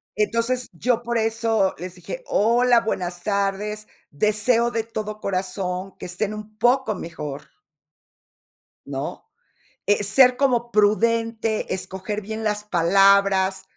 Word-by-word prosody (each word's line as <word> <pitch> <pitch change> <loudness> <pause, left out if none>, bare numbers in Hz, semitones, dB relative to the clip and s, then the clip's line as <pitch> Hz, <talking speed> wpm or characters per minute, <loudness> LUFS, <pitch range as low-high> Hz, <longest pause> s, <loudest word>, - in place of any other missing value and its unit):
Entonces, 230 +4 0
yo 235 +7 0
por 235 0 -2
eso 225 -3 +1
les 180 +2 -7
dije: - - -8
"Hola, 235 +2 +3
buenas 175 -5 -3
tardes, 205 +1 -2 0.2
deseo 215 - +2
de 225 -2 -2
todo 215 -2 -6
corazón 185 0 -3
que - - -8
estén 195 +4 -3
un 215 0 -9
poco 250 -1 +2
mejor". 150 -5 -7 1.4
¿No?, - - -5 0.6
eh, 205 0 +2
ser 250 +5 +5
como 245 -3 +1
prudente, 225 +1 +1
escoger 190 +2 -4
bien 220 +2 -6
las 210 -1 -1
palabras. 195 +1 +3
210 Hz, 120 wpm, -23 LUFS, 190-230 Hz, 1.4 s, ser